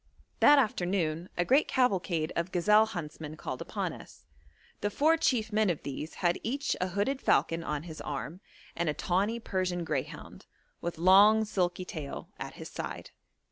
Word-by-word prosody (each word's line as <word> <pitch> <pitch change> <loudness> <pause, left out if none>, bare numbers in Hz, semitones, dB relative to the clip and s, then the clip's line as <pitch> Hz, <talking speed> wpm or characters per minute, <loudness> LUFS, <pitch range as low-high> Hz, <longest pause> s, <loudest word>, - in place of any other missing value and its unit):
That 290 - +7
afternoon 180 - 0
a 175 - +1
great 275 +8 +4
cavalcade 185 - +1
of 170 +2 -2
gazelle 210 +5 +4
huntsmen 160 -6 -7
called - - -5
upon - - -3
us. - - -13 0.6
The 205 - -1
four 305 +9 +3
chief 235 -9 0
men 215 -1 +3
of 170 - -2
these 145 +3 -6
had 175 -1 +1
each 280 +5 -1
a 185 - +1
hooded 205 +9 -1
falcon 165 0 +2
on 150 -2 -3
his 160 -2 -8
arm, 150 +5 -5 0.3
and 170 -1 0
a 150 - -1
tawny 200 +9 0
Persian 185 -5 -2
greyhound, - - -5 0.3
with 170 -1 -4
long 200 +5 +6
silky 185 -3 -1
tail, 150 -5 -7
at - - -6
his - - -8
side. - - -6
185 Hz, 165 wpm, -30 LUFS, 165-215 Hz, 0.6 s, That